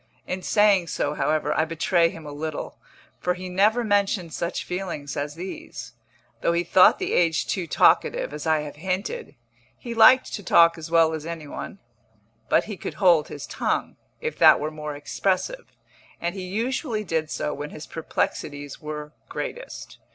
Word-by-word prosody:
In 185 +1 -4
saying 200 -2 +3
so, 145 -1 -1
however, 155 +1 0
I 155 - +3
betray 165 +1 +2
him 165 -2 -10
a 145 - -7
little, 155 +1 -5 0.4
for 180 0 0
he 185 0 -7
never 210 +6 +3
mentioned 200 -5 +1
such 170 +1 -3
feelings 180 -6 -5
as 145 +1 -3
these. 180 +3 -8 0.5
Though 170 - +2
he 170 +1 +1
thought 185 +2 +6
the - - -2
age 165 -2 +2
too 180 -4 -2
talkative, - - +3
as - - -5
I 155 -1 +3
have 150 -1 -8
hinted, 190 - -3 0.4
he 240 -2 -6
liked 255 +3 +6
to 205 - -4
talk 170 -3 +5
as 165 -1 -8
well 165 -1 +4
as 160 0 -5
any 165 -2 -6
one; 145 - -7 0.7
but - - +4
he 210 -3 -7
could - - -6
hold 175 -6 +4
his 145 - -7
tongue, - - -2 0.3
if - - -4
that - - +8
were 155 +1 -3
more 150 -1 -6
expressive, 195 - -2 0.5
and 170 0 -2
he 190 -2 -6
usually 230 - -2
did 160 -4 -1
so 150 - -2
when 145 +1 -6
his 155 - -9
perplexities 145 -3 -3
were 150 0 -6 0.2
greatest. - - -7
170 Hz, 175 wpm, -24 LUFS, 155-195 Hz, 0.7 s, that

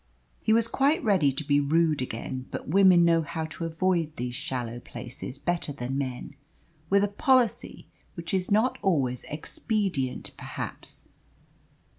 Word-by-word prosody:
He - - +1
was 230 0 +4
quite 280 +6 +2
ready 185 -10 +3
to 135 +3 -4
be 145 0 +3
rude 155 0 +2
again, 130 +1 -5
but - - -6
women 185 0 +6
know 165 -1 +4
how 160 0 -4
to 165 +1 -5
avoid 165 -1 0
these 125 0 -4
shallow 125 -4 -3
places 125 +2 -8
better 170 0 -2
than 135 -1 -4
men, 130 -1 -4 0.6
with 200 +1 +4
a - - +3
policy 250 +2 +1 0.3
which 170 +1 -5
is 185 -1 0
not 220 +5 +2
always 135 -10 +1
expedient 155 - -2
perhaps. - - -7
165 Hz, 145 wpm, -27 LUFS, 135-195 Hz, 0.6 s, women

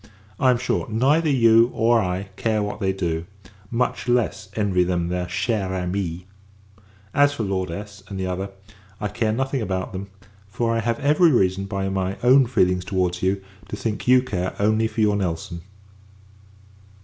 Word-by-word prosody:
I 130 - +4
am 125 - +4
sure, 125 - -1
neither 140 +9 +2
you 115 -3 +5
or 115 0 +3
I 95 +2 -3
care 110 -2 0
what 105 - -4
they 95 -1 +1
do; 85 -3 -3 0.4
much 125 +1 -1
less, 110 -4 0
envy 100 -4 +2
them 90 -1 -1
their 90 0 -2
chere 100 +1 -1
amies. 90 -1 -3 0.9
As 145 0 +4
for 115 - -2
Lord 95 -2 -2
S, 100 +3 -7
and 100 -2 -6
the 95 - -1
other, 95 +2 -3 0.5
I 105 - -2
care 110 +1 0
nothing 135 +3 -1
about 95 0 -3
them; 100 +1 -6 0.4
for 115 +3 -1
I 115 - +1
have 115 +3 -1
every 150 +4 +4
reason, 95 -5 +2
by 95 0 -3
my 95 0 -2
own 130 +1 +6
feelings 90 -7 +2
towards 90 -1 -1
you, 95 +1 0 0.3
to - - -4
think 110 +1 -4
you 125 0 +6
care 95 -7 -3
only 110 +2 +2
for 110 - -3
your 105 -1 +3
Nelson. 85 -3 -3
100 Hz, 175 wpm, -23 LUFS, 95-115 Hz, 0.9 s, own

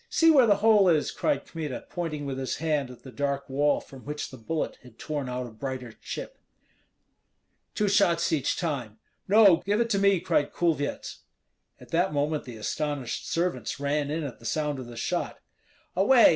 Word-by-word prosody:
See 330 0 +5
where 265 -6 +6
the 205 - +5
hole 210 -4 +6
is!" 155 -3 +2
cried 295 - 0
Kmita, 155 -6 -5
pointing 155 -4 -3
with 135 -1 -3
his 130 - -2
hand 150 -5 0
at 125 - -13
the 130 - -10
dark 140 0 -2
wall 145 +2 +2
from 135 -2 -13
which 150 +1 -5
the 130 - -9
bullet 155 +8 -3
had 125 -3 -16
torn 145 -4 -4
out 125 0 -3
a 120 - -9
brighter 130 +1 -5
chip. - - -7 1.4
"Two 210 - +1
shots 170 -4 +3
each 140 -4 +1
time!" 130 - -3 0.3
"No; 200 -3 +7
give 205 +5 -1
it 230 -1 +1
to 200 - +2
me," 200 -2 +4
cried 145 - 0
Kulvyets. 160 -4 -1 0.6
At - - -14
that 175 +1 +2
moment 150 +1 0
the 120 -3 -8
astonished 145 +2 -3
servants 175 -3 -1
ran 145 0 0
in 155 +2 -2
at 135 -5 -6
the 115 - -15
sound 150 +3 -1
of 125 - -7
the 120 -1 -10
shot. - - -2 0.6
"Away! 225 +6 +7
150 Hz, 185 wpm, -27 LUFS, 135-175 Hz, 1.4 s, No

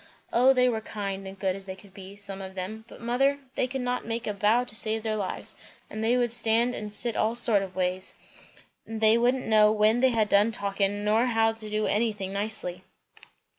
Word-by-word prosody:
O 250 +3 +5
they 250 -1 +3
were 225 -3 -1
kind 195 -2 -5
and 190 0 -9
good 190 -1 -1
as 195 0 -10
they 190 - -6
could 195 0 -18
be, 195 0 -11
some 200 -1 -8
of 190 0 -8
them; 215 +4 -6
but - - -13
mother, 265 +4 +1 0.2
they 255 - 0
could 265 +1 -4
not 250 0 -2
make 230 +1 -4
a 210 - -2
bow 210 +4 +2
to 240 -3 -9
save 220 0 +2
their 220 -1 -1
lives, 200 -3 -5 0.4
and 215 - -4
they 235 +3 +2
would 240 -2 +1
stand 235 +1 +3
and 210 -3 -6
sit 235 +2 0
all 220 +2 0
sorts 210 -4 +2
of 185 -1 -14
ways; 185 0 -2 0.7
and 225 0 -5
they 220 0 +5
wouldn't 245 +2 +1
know 215 -1 +5
when 215 +2 +3
they 260 +1 +4
had 225 -3 +1
done 205 +2 +3
talking, 200 -1 -1
nor 220 +4 +3
how 225 -2 +2
to 220 -1 -6
do 215 0 -1
anything 205 -3 -1
nicely." 200 -3 -4
215 Hz, 220 wpm, -27 LUFS, 200-235 Hz, 0.7 s, O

